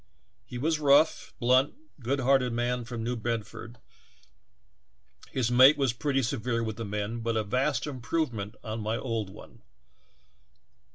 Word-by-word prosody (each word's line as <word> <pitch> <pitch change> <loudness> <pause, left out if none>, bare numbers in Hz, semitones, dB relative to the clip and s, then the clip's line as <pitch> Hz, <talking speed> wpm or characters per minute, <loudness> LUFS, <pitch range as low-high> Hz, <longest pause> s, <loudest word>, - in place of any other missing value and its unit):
He 125 - -7
was 155 +5 0
a - - -8
rough, 140 -4 +4
blunt, 130 +3 +3 0.2
good 135 +3 -1
hearted 130 -2 +3
man 120 0 -1
from 115 -1 -5
New 120 +2 -1
Bedford; 115 0 -5 1.5
his 125 -3 -1
mate 130 +4 +7
was 135 -4 +1
pretty 135 +2 0
severe 120 -1 -1
Avith 110 -1 -4
the 115 - -4
men, 105 +3 -3
but 115 0 -1
a 110 - +1
vast 125 +5 0
improvement 125 -6 -3
on 110 -1 -4
my 110 +2 -1
old 115 -6 -3
one. - - -14
120 Hz, 150 wpm, -28 LUFS, 115-135 Hz, 1.5 s, mate